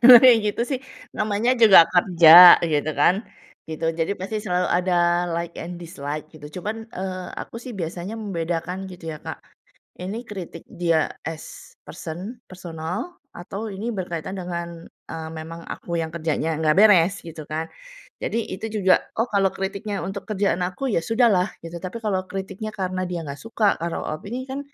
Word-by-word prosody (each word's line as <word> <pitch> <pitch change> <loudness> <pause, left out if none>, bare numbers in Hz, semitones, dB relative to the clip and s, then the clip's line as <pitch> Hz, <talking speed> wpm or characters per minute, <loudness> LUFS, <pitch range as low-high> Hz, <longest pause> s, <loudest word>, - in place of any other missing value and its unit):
Kalo 245 +1 +12
kayak 250 -3 +8 0.2
gitu 235 - -1
sih 265 - 0 0.4
namanya 215 +3 +1
juga 210 -4 +9
kerja, 175 -1 +9
gitu 155 -2 0
kan, 160 +5 +5 0.5
gitu. 160 +1 -5
Jadi 165 +5 0
pasti 195 +3 -3
selalu 180 -3 0
ada 180 +1 +1 0.4
like 170 0 -4
and 175 +1 -6
dislike, 155 -3 -6
gitu. 150 -2 -11
Cuman, 210 +4 -3 0.2
eee, 185 -1 -4
aku - - -8
sih 250 0 -8
biasanya 175 +4 -5
membedakan, 180 -2 -3
gitu 180 -2 -12
ya, 155 - -8
Kak, - - -6 0.6
ini 190 +4 -4
kritik 180 -5 -7
dia 165 -3 +1 0.2
as 165 -1 -8
person, 180 +9 -7
personal 180 - -6 0.2
atau 195 +5 -6
ini 210 +5 -4
berkaitan 175 -2 -4
dengan, 170 -2 -5 0.3
eee, 160 0 -5
memang 165 +1 -8
aku 170 - -6
yang 160 -1 -3
kerjanya 160 -1 -1
nggak 155 -1 +3
beres, 200 -3 +6
gitu 160 -2 -9
kan. 160 +1 -3 0.6
Jadi 230 0 -1
itu 190 +4 -5
juga, 200 -4 +3 0.2
oh, 225 - +2
kalau 195 -2 +2
kritiknya 200 +1 -4
untuk 195 +1 -6
kerjaan 200 -3 0
aku, 180 +9 -3
ya 165 - +2
sudahlah 220 -3 +3 0.2
gitu. 165 +1 -6
Tapi 185 +5 -5
kalau 195 -3 0
kritiknya 195 +2 -5
karena 185 -2 -2
dia 175 - -3
nggak 140 0 -6
suka, 225 -1 -1 0.2
karena 170 0 -2
opini 235 +11 -6
kan, 270 +1 -4
180 Hz, 165 wpm, -23 LUFS, 165-205 Hz, 0.6 s, Kalo